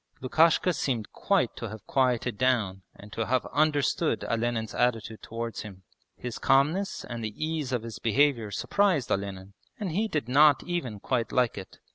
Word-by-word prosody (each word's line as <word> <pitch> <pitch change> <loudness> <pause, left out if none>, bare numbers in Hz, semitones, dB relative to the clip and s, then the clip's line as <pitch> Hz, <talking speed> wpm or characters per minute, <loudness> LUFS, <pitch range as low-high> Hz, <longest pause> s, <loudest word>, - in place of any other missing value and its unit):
Lukashka 165 +6 +3
seemed 125 -7 -2
quite 190 - +1
to 115 - -5
have 110 0 -10
quieted 125 -3 +1
down 110 -6 +1
and 105 +1 -13
to 115 - -2
have 130 +1 +1
understood 145 -1 +1
Olenin's 115 -1 -1
attitude 115 -3 0
towards 115 0 -5
him. 95 -3 -10 0.3
His 125 -2 -6
calmness 155 +9 +2
and 120 -1 -6
the 110 -1 -4
ease 155 -3 -2
of 120 -3 -1
his 115 -1 -7
behaviour 120 -1 +2
surprised 175 - +1
Olenin, 100 0 -3 0.3
and 200 -5 -3
he 210 +7 0
did 150 - -2
not 145 +1 +5
even 165 - -3
quite 115 0 -1
like 125 -3 +2
it. 95 -2 -9
125 Hz, 165 wpm, -28 LUFS, 110-145 Hz, 0.3 s, not